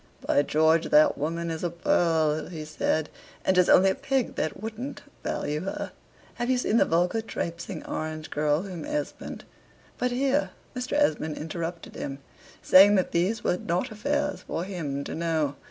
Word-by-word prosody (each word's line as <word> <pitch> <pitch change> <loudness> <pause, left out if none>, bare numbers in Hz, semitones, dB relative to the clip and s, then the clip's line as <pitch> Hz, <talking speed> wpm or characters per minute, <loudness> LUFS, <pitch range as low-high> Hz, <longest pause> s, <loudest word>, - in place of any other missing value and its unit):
"By - - +4
George, 160 +3 +3
that 150 +1 +6
woman 165 +3 -2
is 160 +1 -4
a 175 - +1
pearl!" 160 -3 +1
he 160 -3 -6
said; 155 0 0 0.4
"and 190 - +3
'tis 180 -1 +4
only 190 +1 +6
a - - 0
pig 270 -2 -1
that 155 - -2
wouldn't 225 +6 -6 0.2
value 150 +1 -2
her. 195 - -4 0.5
Have 240 - 0
you 260 - +3
seen 230 -2 +1
the - - +5
vulgar 180 +7 +1
traipsing 170 -4 -5
orange 155 0 -4
girl 150 +2 +1
whom 185 -4 -6
Esmond" 300 0 -4 0.6
but 250 - +1
here 270 +3 +1 0.3
Mr. 250 0 -3
Esmond 155 - +1
interrupted 165 +2 -5
him, 135 0 -4 0.5
saying, 200 +2 +8
that 185 - +1
these 190 +6 0
were 180 - +1
not 180 +8 -2
affairs 290 +7 -1
for 170 - -4
him 155 -8 -4
to - - -6
know. 160 -4 0
170 Hz, 170 wpm, -27 LUFS, 155-220 Hz, 0.6 s, saying